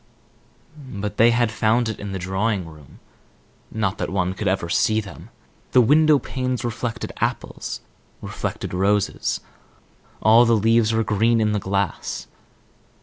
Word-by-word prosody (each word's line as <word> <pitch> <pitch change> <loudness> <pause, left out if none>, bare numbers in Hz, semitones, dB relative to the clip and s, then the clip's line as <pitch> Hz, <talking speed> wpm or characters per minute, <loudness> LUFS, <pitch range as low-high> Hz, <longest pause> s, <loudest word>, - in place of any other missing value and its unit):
But 105 +1 -5
they 115 +1 +6
had 120 -1 +2
found 110 +2 +1
it 110 - -4
in 100 -1 -6
the 95 - -3
drawing 95 +1 -1
room. 75 -4 -15 0.7
Not 105 -4 -2
that - - -2
one 95 -1 -1
could 100 +2 -4
ever 95 -2 0
see 110 +5 +2
them. 100 -3 -9 0.4
The 125 - +7
window 150 +5 +5
panes 130 -2 -3
reflected 115 0 -4
apples, - - -3 0.4
reflected - - -5
roses; 100 +2 0 0.8
all 110 +3 +6
the 115 0 +4
leaves 115 +1 +3
were 115 0 +1
green 110 +3 +2
in 110 -1 +2
the 105 - 0
glass. 100 0 -2
110 Hz, 145 wpm, -22 LUFS, 95-115 Hz, 0.8 s, The